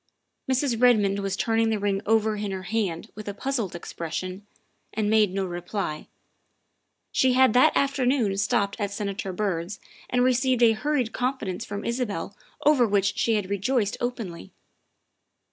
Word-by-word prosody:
Mrs. 255 -3 0
Redmond 210 -5 +4
was 195 0 -2
turning 225 -1 +1
the 220 - +1
ring 200 -1 0
over 220 0 +3
in 205 -1 -3
her 190 -1 -4
hand 195 -6 -2
with 215 0 -9
a 200 - -4
puzzled 235 -8 -2
expression, 180 +4 -5 0.4
and 210 -1 -1
made 215 -3 +4
no 195 0 -1
reply. 175 -2 -4 1.0
She 260 -1 +3
had 260 -3 +5
that 250 - +5
afternoon 260 -6 +1
stopped 200 0 +1
at 205 -1 -1
Senator 200 -1 -4
Byrd's 185 -1 -2 0.3
and 250 0 +2
received 255 -1 +2
a 230 - +7
hurried 250 +1 -1
confidence 250 -8 -2
from 205 0 -5
Isabel 230 -6 -3 0.3
over 280 -5 +5
which 200 -1 +1
she 230 - +1
had 200 -2 -2
rejoiced 205 +1 0
openly. 225 - -4
210 Hz, 150 wpm, -25 LUFS, 195-245 Hz, 1.0 s, a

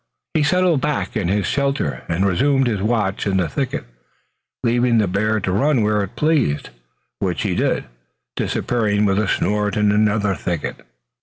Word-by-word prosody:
He 155 - +2
settled 170 -1 +2
back 150 -2 -2
in 105 -6 0
his 100 +1 +1
shelter 140 +4 -1
and 85 +4 +1
resumed 135 +8 +2
his 110 -5 -1
watch 105 -3 0
in 95 -1 +1
the 90 -3 +1
thicket, 75 - -3 0.8
leaving 120 0 +2
the 105 -3 +3
bear 110 +4 0
to 95 -1 -2
run 125 +5 +2
where 105 0 +2
he 100 - -2
pleased, 145 - 0 0.5
which - - -1
he - - 0
did, - - 0 0.5
disappearing 105 -3 0
with 100 0 +2
a 110 - 0
snort 105 0 0
in 105 -1 +3
another 105 -1 +2
thicket. 85 -8 -4
105 Hz, 165 wpm, -20 LUFS, 100-125 Hz, 0.8 s, the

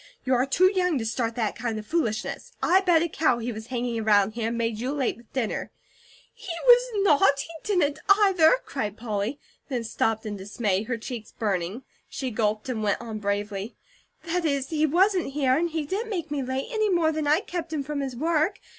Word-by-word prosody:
You 260 - +2
are 255 +2 +2
too 370 +7 +4
young 360 -5 +1
to 225 - -3
start 230 0 -1
that 220 -4 -1
kind 230 -1 -3
of 215 - -6
foolishness. 225 -8 -2
I 375 +2 +5
bet 345 -4 +4
a - - 0
cow 310 -6 +1
he 235 +1 -3
was 220 0 -8
hanging 245 -2 -2
around 210 -2 +3
here, 225 0 -3
and 230 +1 -2
made 230 -2 -1
you 250 +3 -2
late 280 -4 0
with 235 -2 -20
dinner." 245 -5 -2 0.6
"He 370 - -8
was - - +7
not! 295 -5 +4
He 325 - -8
didn't 310 -8 +1
either!" 395 -2 +6
cried 210 -6 -4
Polly, 220 +3 -3 0.3
then 250 -4 -2
stopped 225 0 -1
in 205 -1 -4
dismay, 200 0 -1
her 235 +1 -2
cheeks 230 -1 -7
burning. 200 +2 -2 0.3
She 260 -2 -4
gulped 215 0 -1
and 240 -4 -2
went 205 -2 +1
on 225 -2 -6
bravely: 205 +1 -3 0.5
"That 345 +1 -1
is, 280 -4 0
he 310 -1 +2
wasn't 360 -1 +2
here, 270 -3 +2
and 340 +4 +1
he 315 -2 -2
didn't 410 +9 -3
make 340 -7 -4
ME 290 -2 -1
late, 260 - -3
any 435 -2 +1
more 340 -4 +3
than 310 -1 -2
I 305 +5 +4
kept 340 -4 -5
HIM 300 -3 -2
from 295 +1 -4
his 270 -3 -3
work. 325 +7 +1
265 Hz, 210 wpm, -26 LUFS, 220-330 Hz, 0.6 s, was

